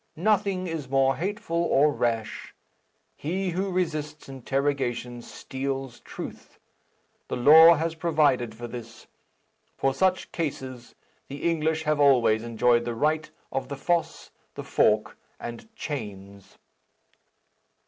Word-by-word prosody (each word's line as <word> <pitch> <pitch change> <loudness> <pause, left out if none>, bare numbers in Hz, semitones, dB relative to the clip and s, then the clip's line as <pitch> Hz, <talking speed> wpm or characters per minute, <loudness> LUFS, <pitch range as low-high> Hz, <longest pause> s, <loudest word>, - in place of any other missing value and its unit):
Nothing 195 0 +1
is 160 -6 -5
more 135 0 +3
hateful 170 -2 -2
or 150 -2 +3
rash. 115 -2 -2 0.6
He 185 +4 -2
who 190 +3 -1
resists 155 -4 -2
interrogation 135 -2 -2
steals 135 0 -5
truth. - - -9 0.7
The - - -3
law 160 +6 +8
has 165 +1 -1
provided 150 -8 +1
for 120 +1 -7
this. 115 -2 -9 0.7
For 135 - +1
such 185 +5 +1
cases, 130 -6 -5 0.3
the 140 +4 -3
English 160 -1 0
have 155 -1 +1
always 125 -6 +4
enjoyed 120 +1 +2
the 120 0 -3
right 155 +5 0 0.2
of 135 -1 -2
the 140 +1 -6
foss, 170 +3 -1 0.2
the - - -6
fork, - - +1 0.2
and 120 - -8
chains." 100 - -7
140 Hz, 120 wpm, -26 LUFS, 120-165 Hz, 0.7 s, law